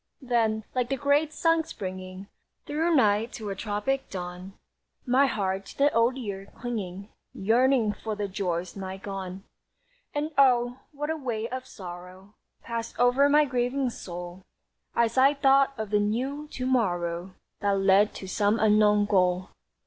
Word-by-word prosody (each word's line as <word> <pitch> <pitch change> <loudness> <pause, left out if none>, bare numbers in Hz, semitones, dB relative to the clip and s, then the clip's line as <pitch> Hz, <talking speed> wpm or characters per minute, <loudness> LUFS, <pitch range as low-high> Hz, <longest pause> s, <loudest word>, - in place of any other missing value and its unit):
Then, 225 -3 +1
like 250 -2 0
the 270 - 0
great 285 +3 +2
sun 330 +1 +2
springing 185 -5 -7 0.4
Through 320 +3 +1
night 215 -2 +3
to 215 -3 -5
a - - -3
tropic 215 +7 -2
dawn, 180 +1 -7 0.5
My 265 +2 +4
heart, 195 -4 -2
to - - -12
the 285 +1 +3
Old 235 +3 +3
Year 200 -5 -5
clinging, 200 -5 -5 0.3
Yearned 230 +1 +2
for 220 -1 -4
the 205 -1 -2
joys 180 -2 -3
nigh 190 -1 -6
gone. 195 -1 -6 0.7
And 300 +2 -1
oh, 245 -2 +4
what 295 +1 -3
a - - -1
wave 235 -6 -3
of 255 0 -5
sorrow 185 -1 -10 0.3
Passed 230 -1 -5
over 250 +4 +4
my 300 +1 +5
grieving 250 0 0
soul, 175 -2 -8 0.5
As 235 +2 +2
I 275 +2 +5
thought 275 0 +4
of 220 -2 -5
the 210 - +3
new 260 +8 -2
to 255 -3 -5
morrow 180 -7 0 0.2
That 200 -1 +1
led 195 +2 +4
to 190 - -7
some 205 +2 +1
unknown 210 -1 +4
goal! 185 -2 +2
220 Hz, 155 wpm, -27 LUFS, 195-260 Hz, 0.7 s, my